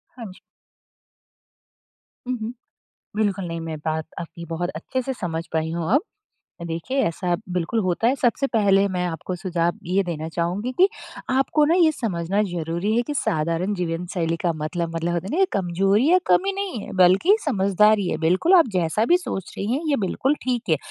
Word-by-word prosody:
हाँ 240 -3 -8
जी। - - -16 1.9
हुँ, 255 -1 -1
हुँ। 220 +2 -4 0.6
बिल्कुल 200 -3 0
नहीं। 165 -1 -4
मैं 165 -1 -5
बात 160 0 -1 0.2
आपकी 170 0 -8
बहुत 170 +2 -3
अच्छे 255 +10 -3
से 265 +2 -3
समझ 165 -6 -4
पाई 160 0 0
हूँ 170 +4 -2
अब। 285 - +4 0.7
देखिए 165 +12 -3
ऐसा 175 +1 -1 0.2
बिल्कुल 180 +5 -1
होता 185 +5 +1
है। 255 - +3
सबसे 270 +1 +1
पहले 200 -4 +3
मैं 180 -2 -2
आपको 175 +2 -4
सुझाव 175 -1 -1
ये 190 +3 +1
देना 160 -3 -4
चाहूँगी 175 +8 -2
कि 375 +2 +6 0.4
आपको 270 +3 +2
ना 325 +3 +3
ये 335 -3 +5
समझना 195 - -1
ज़रूरी 170 +5 -1
है 240 - +3
कि 295 - -2
साधारण 170 - 0
जीवन 175 -1 -2
शैली 165 -3 0
का 170 - +2
मतलब 165 +2 -3
मतलब 165 +1 -1
होता 170 +1 -2
है - - -5
ना - - 0
ये 385 - +6
कमज़ोरी 195 - +2
या 365 - +7
कम 385 - +3
नहीं 390 - -3
है - - -9
बल्कि 185 - +5
समझदारी 205 - +3
है। 155 - -1
बिल्कुल, 180 - +2
आप 330 -7 +6
जैसा 180 +5 +1
भी 350 - +5
सोच 195 - -5
रही 195 - -2
हैं 285 - -1
ये 285 - +3
बिल्कुल 270 +9 0
ठीक 245 -6 -2
है। 160 - +4
185 Hz, 190 wpm, -23 LUFS, 170-235 Hz, 1.9 s, या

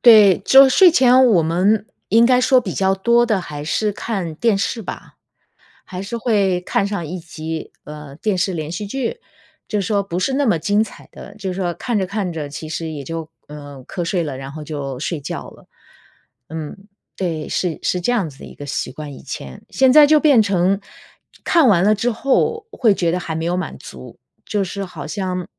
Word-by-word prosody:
对， 215 -5 +7
就 270 0 +8
睡 360 +7 +6
前 255 -4 +5
我 190 -9 +4
们 190 +7 +1 0.2
应 230 +2 +5
该 250 0 +4
说 255 0 +4
比 190 -7 -5
较 190 0 +2
多 235 +5 +3
的 215 -5 +1
还 145 -4 -7
是 210 +7 -1
看 190 -7 -4
电 220 +4 +1
视 225 +3 -2
吧， - - -8 0.7
还 185 0 -7
是 215 +4 -5
会 200 -6 +1
看 195 +2 0
上 200 -5 -3
一 180 +4 -5
集， 160 -1 -6
呃， 150 -2 -10
电 200 +3 -1
视 180 +1 0
连 155 -1 -4
续 180 +5 -4
剧。 270 - -3 0.5
就 210 -2 -1
说 200 +1 0
不 180 -3 -5
是 265 +9 0
那 285 +1 +1
么 215 -8 +3
精 205 +6 +1
彩 220 - -7
的， 200 - -12
就 195 -3 -4
是 180 - -5
说， 175 -2 -1
看 235 +5 -2
着 190 -2 -1
看 200 -2 -3
着 155 -3 -5
其 150 +2 -8
实 160 0 -4
也 145 -3 -6
就， 165 +1 -6 0.2
呃， 145 -3 -10
瞌 175 -3 -4
睡 175 0 0
了， 145 -4 -5
然 135 0 -7
后 155 -1 -7
就 140 -3 -5
睡 155 +4 -3
觉 140 - -6
了。 - - -19 0.8
嗯， 160 +2 -6 0.4
对， 165 -5 -3
是 175 -4 -1
是 180 - 0
这 245 +7 +1
样 195 -10 0
子 135 - -16
的 - - -10
一 - - -12
个 145 - -9
习 140 - -3
惯 150 -2 -8
以 - - -11
前。 65 -2 -8
现 265 -1 +3
在 295 +1 +8
就 305 +1 +5
变 280 -7 +6
成 195 -1 +1 0.6
看 330 -7 +4
完 185 -5 +4
了 210 +2 +4
之 240 +4 0
后， 275 - 0
会 235 - +3
觉 170 -3 0
得 180 - -1
还 165 -2 -5
没 160 - -3
有 175 +1 0
满 185 - -4
足， - - -12 0.3
就 205 -2 -1
是 195 +1 -5
好 160 -6 -9
像 185 0 -3
190 Hz, 230 characters per minute, -19 LUFS, 160-220 Hz, 0.8 s, 就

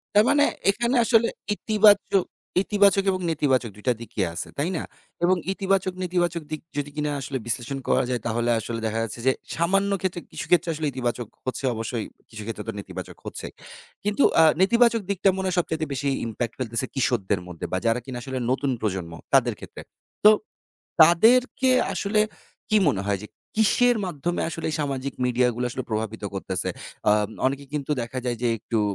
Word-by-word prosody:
তার 210 - +7
মানে 290 0 +5 0.3
এখানে 240 +4 0
আসলে 230 0 +4 0.3
ইতিবাচক 205 -3 +4 0.4
ইতিবাচক 200 -2 +4
এবং 185 -1 -2
নেতিবাচক 135 -7 +1
২ 105 - -15
টা 125 - +5
দিকই 110 -3 -3
আছে, - - -4
তাই 155 +6 0
না? - - -3 0.4
এবং 185 +2 +5 0.2
ইতিবাচক 190 -1 0
নেতিবাচক 175 -2 0
দিক 155 - -4 0.2
যদি 145 0 -2
কিনা 150 -1 -1
আসলে 135 0 -3
বিশ্লেষণ 120 +4 -2
করা - - +3
যায় 125 -3 -1
তাহলে 120 +1 0
আসলে 115 +1 -4
দেখা 110 +1 -1
যাচ্ছে 115 +1 -6
যে - - +7 0.2
সামান্য 195 +4 +2
ক্ষেত্রে 180 -2 -2
কিছু - - -5
ক্ষেত্রে 175 -1 +3
আসলে 155 -1 -2
ইতিবাচক 120 -2 -2 0.2
হচ্ছে 130 +1 -3
অবশ্যই। 115 0 -3 0.2
কিছু 110 -2 -9
ক্ষেত্রে 115 - -5
তো 115 - -2
নেতিবাচক - - -8
হচ্ছে। - - -6 0.6
কিন্তু 210 +7 +1 0.2
আ - - +8 0.2
নেতিবাচক 235 +3 +4
দিকটা 195 0 +3
মনে 190 - -2
হয় 185 - 0
সবচাইতে 160 -2 -1
বেশি 140 +1 -2 0.2
impact 115 +1 -3
ফেলতেছে 115 +1 -1
কিশোরদের 115 -7 +1
মধ্যে 90 -2 -6
বা 95 - +1
যারা 115 +2 +2
কিনা 130 -2 -6
আসলে 130 0 -5
নতুন 135 +1 0
প্রজন্ম 95 -5 -2 0.2
তাদের - - +4
ক্ষেত্রে। - - -10 0.4
তো 215 - +11 0.7
তাদেরকে 240 +10 +5 0.2
আসলে 210 +1 0 0.5
কি 215 - +5
মনে 100 -7 -1
হয় 100 -2 0
যে - - -7 0.3
কিসের 235 +3 +4
মাধ্যমে 175 0 -2
আসলে 165 -1 -4
সামাজিক 140 -2 -2
মিডিয়াগুলো 125 0 +1
আসলে 130 +2 -4
প্রভাবিত 110 -1 -3
করতেছে? 95 -1 -2 0.4
আ - - +6 0.3
অনেকে 140 +1 -1
কিন্তু 150 0 -2
দেখা 125 +2 -4
যায় 120 -2 -1
যে 120 - +2
একটু 110 +1 -2
140 Hz, 175 wpm, -25 LUFS, 115-190 Hz, 0.7 s, তো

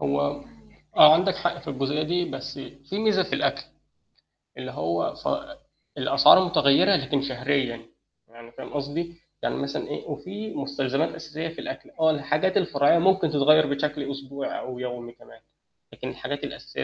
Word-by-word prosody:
هو 70 0 -1 0.5
آه 155 0 +10
عندك 185 +3 +2
حق 175 -2 -2
في - - -12
الجزئية 140 +2 -1
دي، 175 +3 0
بس 145 - -7 0.3
في 195 - -3
ميزة 215 -3 +3
في 185 - -8
الأكل. - - 0 1.0
اللي - - -6
هو 85 +2 -1
ف - - -8 0.7
الأسعار 185 - +6
متغيّرة 175 +3 +4
لكن 140 -3 0
شهريًا 130 -3 -1 0.4
يعني 115 +1 -15
فاهم - - -10
قصدي؟ 150 +4 -3 0.3
يعني - - -1
مثلًا 140 +2 -3
إيه 145 - -6
وفي 185 +9 -6
مستلزمات 140 +2 -1
أساسية 160 0 -6
في 165 - -9
الأكل، - - -7
آه 160 0 +5
الحاجات 155 +6 0
الفرعية 145 -4 +3
ممكن 190 -1 +3
تتغيّر 155 +1 +5
بشكل 145 0 -2
أسبوعي 140 0 -5
أو 125 -1 -7
يومي 125 -1 -6
كمان، 120 - -18 0.5
لكن - - -6
الحاجات - - -5
الأساسية 70 - -6
145 Hz, 155 wpm, -25 LUFS, 135-170 Hz, 1.0 s, آه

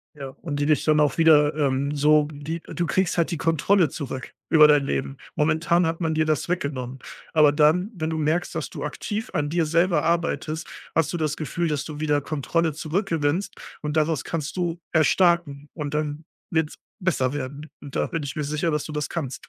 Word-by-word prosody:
Ja, 140 -2 -7
und 145 -4 -3
die 145 - +1
dich 155 -1 +3
dann 155 -1 +3
auch 150 -1 +2
wieder 150 -2 +5
ähm, 140 -1 0
so 150 +1 +4
die 150 +3 -5
du 175 - -2
kriegst 185 0 0
halt 170 +1 +1
die 170 - -2
Kontrolle 165 +3 +2
zurück 130 -3 -6 0.2
über 155 -2 +8
dein 145 -2 +4
Leben. 135 0 -2 0.2
Momentan 160 +2 +2
hat 165 +2 -3
man 160 -1 0
dir 155 0 +1
das 155 -2 0
weggenommen, 135 -7 -3 0.3
aber 155 -3 +6
dann, 160 +7 +3
wenn 160 -2 -2
du 160 - -2
merkst, 155 +3 0
dass - - -3
du - - -7
aktiv 215 +1 -4
an 145 0 0
dir 165 +1 +1
selber 165 0 +2
arbeitest, 165 -1 -1 0.3
hast 165 - +1
du - - -1
das 155 -2 -1
Gefühl, 170 +3 -2
dass 150 -2 -1
du 150 -1 -7
wieder 150 -2 +1
Kontrolle 155 +3 -1
zurückgewinnst, 165 +1 -1 0.3
und 150 0 -2
daraus 155 -2 +1
kannst 155 -3 -4
du 175 -2 -2
erstarken 160 -2 +2
und 150 -2 -4
dann 150 +1 -3 0.3
wird's 160 -3 0 0.2
besser 150 -9 0
werden. 145 +2 -5
Da 140 - -2
bin 165 -3 -3
ich 140 -2 -5
mir 150 - -2
sicher, 150 +3 -1
dass 150 -2 0
du - - -7
das 150 -1 -3
kannst. 140 -7 -5
155 Hz, 200 wpm, -24 LUFS, 145-165 Hz, 0.3 s, über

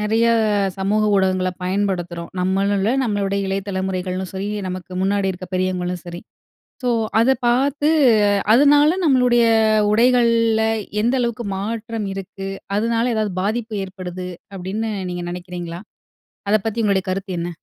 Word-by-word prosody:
நிறைய 225 +2 +2 0.5
சமூக 200 +3 +1
ஊடகங்கள 185 -1 +1
பயன்படுத்துறோம். 180 -3 -2
நம்மளும் 195 +2 +1
இல்லை, 215 +5 +1
நம்மளுடைய 200 -3 -1
இளைய 195 +1 -2
தலைமுறைகளும் 190 -1 -3
சரி 190 +1 -3 0.2
நமக்கு 185 0 -7
முன்னாடி 195 0 +1
இருக்கிற 185 0 -8
பெரியவங்களும் 180 -1 -1
சரி. 175 0 -7 0.6
ஸோ, 250 - +1 0.3
அதை 250 +4 +4
பார்த்து 280 +5 +2 0.6
அதனால 290 +6 +5
நம்மளுடைய 250 -4 +4 0.5
உடைகள்ல 230 -1 +3 0.4
எந்த 240 +4 +1
அளவுக்கு 235 0 -2
மாற்றம் 220 +1 -4
இருக்கு? 195 0 -6 0.3
அதனால 230 +2 +1
ஏதாவது 215 -3 -1
பாதிப்பு 220 +2 -2
ஏற்படுது 185 -1 -7 0.3
அப்படின்னு 195 +4 -3 0.2
நீங்க 175 0 -4
நினைக்கிறீங்களா? 175 -1 -6 0.7
அதை 215 +1 +4
பத்தி 225 +1 -1
உங்களுடைய 195 -2 +1
கருத்து 190 +1 -3
என்ன? 170 - -3
200 Hz, 125 wpm, -20 LUFS, 185-230 Hz, 0.7 s, அதனால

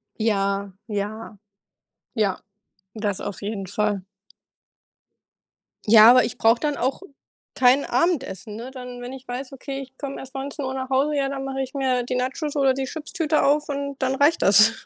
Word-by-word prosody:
Ja, 200 -2 0 0.2
ja. 210 +2 -4 0.8
Ja, 205 -5 +1 0.6
das 205 -3 -2
auf 200 0 -6
jeden 200 -2 -4
Fall. 205 0 -1 1.9
Ja, 220 0 +9
aber 250 +1 +7
ich 230 - -5
brauche 225 +1 +4
dann 295 -1 -1
auch 265 +4 -1 0.5
kein 260 +2 +4
Abendessen, 260 - -1
ne? 245 +3 -7
Dann 250 -2 -8
wenn 245 +2 -7
ich 265 0 -10
weiß, 255 +2 -6
okay, 270 +1 -6
ich 265 -1 -10
komm 275 -1 -5
erst 265 +1 -10
19:00 270 0 -4
nach 260 0 -4
Hause, 280 +3 +1
ja, 275 -1 0
dann 270 -1 -4
mache 270 0 -3
ich 260 - -5
mir 260 -3 0
die 250 +1 -3
Nachos 280 +4 -2
oder 270 -2 +4
die 270 +1 -3
Chipstüte 310 +1 -1
auf 295 +1 +2
und 280 0 -3
dann 265 0 0
reicht 290 +4 +3
das. 215 +3 +5
260 Hz, 170 wpm, -23 LUFS, 220-275 Hz, 1.9 s, Ja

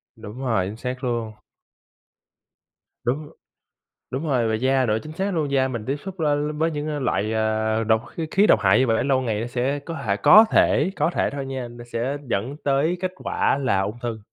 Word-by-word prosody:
Đúng 105 +4 -10
rồi, 115 -8 0
chính 105 +3 -7
xác 125 +2 -5
luôn. 115 -3 -2 1.7
Đúng. 145 +5 -2 0.8
Đúng 135 +5 -3
rồi, 125 -6 +1
về 110 - +1
da 130 +1 +2
nữa 110 0 +1
chính 155 - -9
xác 190 +3 -2
luôn, 155 -4 -1
da 130 -1 +2
mình 120 -4 -5
tiếp 135 - -1
xúc 190 -2 -7
la 150 -2 +2 0.2
với 160 +2 +1
những, 150 -1 -4
à, 150 -1 -2
loại, 110 -4 0
à, 110 0 0
độc 110 +2 +2
kh - - -4
khí 200 +3 +4
độc 110 - +5
hại 100 0 +4
như 130 - +3
vậy, 115 - +2
để - - +1
lâu 135 -1 +2
ngày 110 -5 -2
nó 115 - -3
sẽ 125 +4 -1
có 165 +4 -7
thể 100 -2 +1
có 210 - +8
thể, 150 +7 +3
có - - +1
thể - - +1
thôi 140 -1 -5
nha, 130 -2 -5
nó 120 0 -11
sẽ 125 +5 -1
dẫn 120 +9 -2
tới 145 +5 +2
kết 185 -1 -2
quả 140 - 0
là 115 -8 +1
ung 105 +4 -3
thư 115 -2 -3
130 Hz, 220 wpm, -23 LUFS, 110-145 Hz, 1.7 s, có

